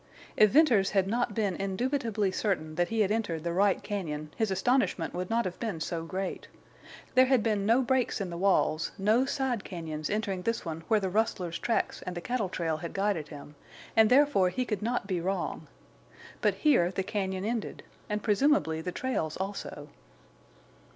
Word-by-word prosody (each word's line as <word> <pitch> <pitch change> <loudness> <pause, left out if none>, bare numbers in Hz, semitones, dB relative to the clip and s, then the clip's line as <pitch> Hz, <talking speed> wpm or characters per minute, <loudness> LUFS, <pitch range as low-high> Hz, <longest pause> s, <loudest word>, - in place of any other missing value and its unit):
If 215 - +6
Venters 240 -9 +4
had 190 - +4
not 235 0 -1
been 205 -5 0
indubitably 210 +1 -1
certain 180 -6 -1
that 175 +2 +1
he 225 +2 0
had 205 -1 +2
entered 205 -8 -1
the 170 0 -2
right 195 +1 +2
cañon 155 -7 -4
his 220 -2 0
astonishment 190 -3 +1
would 180 +1 -4
not 230 -1 +1
have 180 -1 -5
been 215 -8 -3
so 165 0 -3
great. 190 +2 -4 0.7
There 255 0 +6
had 260 -4 +3
been 210 -3 0
no 240 +4 +4
breaks 255 -1 +1
in 190 -3 -3
the 170 - -5
walls, 180 -4 +2
no 215 +6 +3
side 265 -6 -1
cañons 155 -4 -5
entering 200 -3 -1
this 230 +2 -2
one 165 -1 -4
where 220 - +3
the 190 -2 -2
rustlers' 185 -5 -1
tracks 235 -1 -1
and 180 -1 -6
the - - -1
cattle 230 0 -2
trail 165 -3 -1
had 170 +2 -6
guided 195 -6 0
him, 145 -1 -10 0.4
and, 220 -1 +6
therefore, 260 -9 +4
he 255 +7 -2
could 210 -5 -3
not 235 0 -1
be 185 -3 -2
wrong. 190 +3 -3 0.7
But - - +2
here 275 - +3
the 190 +1 -2
cañon 190 -1 -2
ended, 230 -1 -3 0.3
and 210 0 -2
presumably 210 - +2
the 180 - -4
trails 175 -10 -2
also. 190 -6 -5
195 Hz, 185 wpm, -29 LUFS, 175-230 Hz, 0.7 s, If